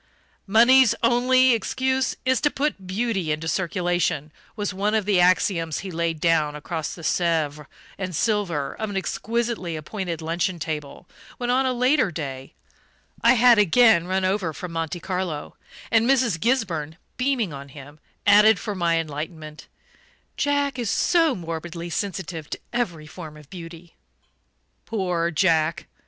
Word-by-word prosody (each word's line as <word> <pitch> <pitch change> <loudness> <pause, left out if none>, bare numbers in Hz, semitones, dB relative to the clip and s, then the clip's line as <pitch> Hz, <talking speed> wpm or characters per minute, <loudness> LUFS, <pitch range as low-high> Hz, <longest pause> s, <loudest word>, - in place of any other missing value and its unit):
"Money's 240 +4 +6
only 255 +2 +4
excuse 260 +3 0
is 260 -1 +2
to 295 - +3
put 275 -11 -3
beauty 195 -4 -1
into 155 +2 -3
circulation," 175 -4 -1 0.2
was 205 -3 -3
one 205 +3 0
of 215 -3 +1
the 200 -3 +3
axioms 175 -3 +2
he 190 - -5
laid 165 -1 -2
down 155 -3 +2
across 160 +1 -4
the 170 - -11
Sèvres 155 -4 0 0.3
and 185 -3 -4
silver 175 -9 0
of 220 -1 -2
an 200 - -3
exquisitely 225 -3 -2
appointed 170 +2 -5
luncheon 170 +3 -1
table, 155 +1 -6 0.3
when, 245 0 -1
on 260 +1 +2
a - - +1
later 250 -1 +2
day, 135 -5 -6 0.7
I 235 +2 +6
had 245 -2 +6
again 210 -2 +5
run 190 0 0
over 185 -4 0
from 180 +3 -7
Monte 165 +1 -3
Carlo; 180 -4 -4 0.4
and 230 +2 +3
Mrs. 250 -10 +2
Gisburn, 175 - -1 0.2
beaming 250 - 0
on 140 0 -9
him, 145 +2 -12 0.3
added 210 +1 +6
for 205 +3 -4
my 170 -3 +1
enlightenment: 155 0 -6 0.7
"Jack 285 -2 0
is 235 -4 -1
so 330 - +2
morbidly 170 0 -6
sensitive 180 -5 -4
to - - -5
every 175 -11 -2
form 155 -1 -10
of 150 -2 -17
beauty." 170 -1 -10 0.9
Poor 180 -6 -1
Jack! 160 -2 +1
180 Hz, 145 wpm, -24 LUFS, 160-230 Hz, 0.9 s, Money's